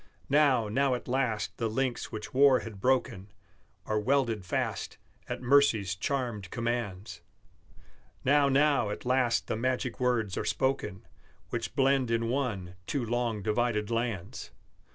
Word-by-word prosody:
Now, 140 Hz, -6 st, +4 dB
now 130 Hz, +4 st, +1 dB
at 125 Hz, -, -7 dB
last 125 Hz, -4 st, -1 dB
the 115 Hz, -1 st, 0 dB
links 125 Hz, +2 st, -2 dB
which 105 Hz, -1 st, -7 dB
war 135 Hz, -1 st, +5 dB
had 105 Hz, -4 st, -9 dB
broken 120 Hz, -6 st, 0 dB, 0.5 s
Are 110 Hz, 0 st, 0 dB
welded 115 Hz, -3 st, +1 dB
fast, 90 Hz, -, -3 dB, 0.3 s
at -, -, -4 dB
mercy's 120 Hz, -8 st, +4 dB
charmed 110 Hz, -1 st, -3 dB
commands; 110 Hz, -6 st, -3 dB, 1.0 s
Now, 140 Hz, +1 st, +4 dB
now 140 Hz, -4 st, +3 dB
at 105 Hz, -, -6 dB
last 125 Hz, -1 st, +2 dB
the -, -, -2 dB
magic 125 Hz, +1 st, -2 dB
words 120 Hz, -6 st, 0 dB
are -, -, -2 dB
spoken 105 Hz, -7 st, -1 dB, 0.5 s
Which -, -, -4 dB
blend 135 Hz, -2 st, +3 dB
in 115 Hz, 0 st, 0 dB
one 115 Hz, -9 st, -2 dB
two 135 Hz, -4 st, -1 dB
long 115 Hz, -3 st, -1 dB
divided 110 Hz, 0 st, 0 dB
lands! 115 Hz, -6 st, -3 dB
120 Hz, 135 wpm, -29 LUFS, 105-130 Hz, 1.0 s, war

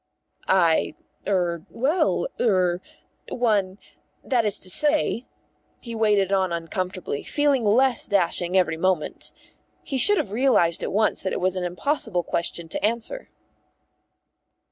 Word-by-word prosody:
"I 170 Hz, -4 st, +2 dB, 0.3 s
er 175 Hz, -4 st, 0 dB
well 300 Hz, -, 0 dB
er 185 Hz, -5 st, +1 dB, 0.5 s
one 205 Hz, -6 st, 0 dB, 0.5 s
that 245 Hz, -4 st, +1 dB
is 210 Hz, -1 st, +3 dB
to -, -, -5 dB
say." 295 Hz, -, +1 dB, 0.5 s
He 235 Hz, -, -8 dB
waded 210 Hz, -4 st, +2 dB
on 190 Hz, -2 st, +1 dB
uncomfortably, 175 Hz, -2 st, -4 dB
feeling 290 Hz, -4 st, +1 dB
less 240 Hz, +4 st, +2 dB
dashing 180 Hz, -2 st, +1 dB
every 175 Hz, -3 st, +1 dB
moment. 180 Hz, -2 st, -1 dB, 0.5 s
He 270 Hz, -, -3 dB
should 410 Hz, +9 st, +4 dB
have 200 Hz, -, -2 dB
realised 215 Hz, -9 st, +3 dB
at -, -, -3 dB
once 215 Hz, +2 st, +1 dB
that 190 Hz, -, -3 dB
it -, -, -2 dB
was 185 Hz, +1 st, 0 dB
an 185 Hz, -, -3 dB
impossible 180 Hz, -, -1 dB
question 170 Hz, 0 st, -3 dB
to -, -, -5 dB
answer. 235 Hz, -, -2 dB
195 Hz, 130 wpm, -24 LUFS, 180-240 Hz, 0.5 s, should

